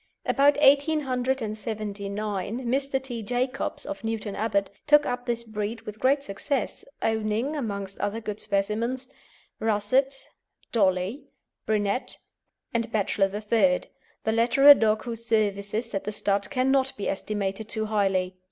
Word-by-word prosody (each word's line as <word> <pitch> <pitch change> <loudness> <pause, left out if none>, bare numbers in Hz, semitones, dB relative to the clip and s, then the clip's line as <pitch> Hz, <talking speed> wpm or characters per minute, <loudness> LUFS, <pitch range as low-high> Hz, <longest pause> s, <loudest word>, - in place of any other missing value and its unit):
About 285 +1 +4
1879 220 - 0
Mr. 270 +2 0
T. 240 -3 -5
Jacobs, 245 +4 -2
of 295 -4 -6
Newton 225 -2 -3
Abbot, 200 -2 0 0.2
took 295 0 +6
up 245 0 -3
this 235 -1 -1
breed 220 0 -4
with 215 -1 -9
great 275 +2 +3
success, 265 +6 -3 0.2
owning, 220 +6 0
amongst 200 -7 -4
other 210 +2 -1
good 210 -2 -5
specimens, 220 +6 -1 0.5
Russett, 225 +6 +1 0.4
Dolly, 195 +5 +1 0.4
Brunette, 210 +2 0 0.6
and 230 0 -1
Bachelor 200 -2 +1
III., 205 -2 +2 0.4
the 220 - +1
latter 235 +5 +3
a 290 - +14
dog 220 -4 +1
whose 230 -2 -6
services 215 0 0
at 195 - -2
the 210 - -2
stud 200 -1 0
cannot 265 0 +1
be 205 - -3
estimated 205 +1 -3
too 220 -1 0
highly. 190 -3 0
220 Hz, 130 wpm, -26 LUFS, 205-255 Hz, 0.6 s, a